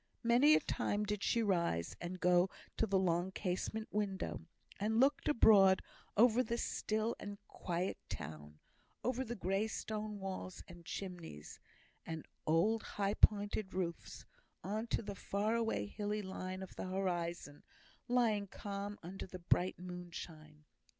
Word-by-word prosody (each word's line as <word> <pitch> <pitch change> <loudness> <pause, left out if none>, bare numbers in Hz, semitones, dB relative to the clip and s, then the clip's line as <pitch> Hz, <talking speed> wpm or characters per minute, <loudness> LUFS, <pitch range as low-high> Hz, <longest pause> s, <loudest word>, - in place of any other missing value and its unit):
Many 250 +6 +6
a - - +5
time 205 +1 -1
did 210 -1 -2
she 230 +3 +2
rise, 170 - +1
and 180 +1 -4
go 180 +1 +4 0.3
to 225 - +1
the 195 -1 +3
long 180 0 +1
casement 200 +4 -2
window, 200 -2 -1 0.4
and 220 +3 +1
look 275 +2 +4
abroad 200 -8 +7 0.3
over 235 +2 +6
the 235 -2 -1
still 220 0 -1
and 205 0 -6
quiet 180 +1 -2
town 75 0 -7 0.5
over 255 +1 0
the 240 -1 -4
grey 195 +2 0
stone 215 -1 -4
walls, 190 -1 -5
and 175 -1 -12
chimneys, 175 - -6 0.4
and 160 -1 -5 0.2
old 205 +8 +3
high 200 0 -1
pointed 205 -2 +3
roofs 175 -2 -3 0.4
on 215 +3 -2
to 235 - 0
the 205 -1 -4
far 200 +3 -1
away 225 - +1
hilly 210 - -3
line 185 0 -5
of 190 - -10
the - - -4
horizon, 175 -5 -2 0.5
lying 225 -5 +2
calm 200 +1 -5
under 185 +3 -6
the 185 - -7
bright 180 +1 +1
moonshine. 170 -4 -8
195 Hz, 145 wpm, -36 LUFS, 175-215 Hz, 0.5 s, abroad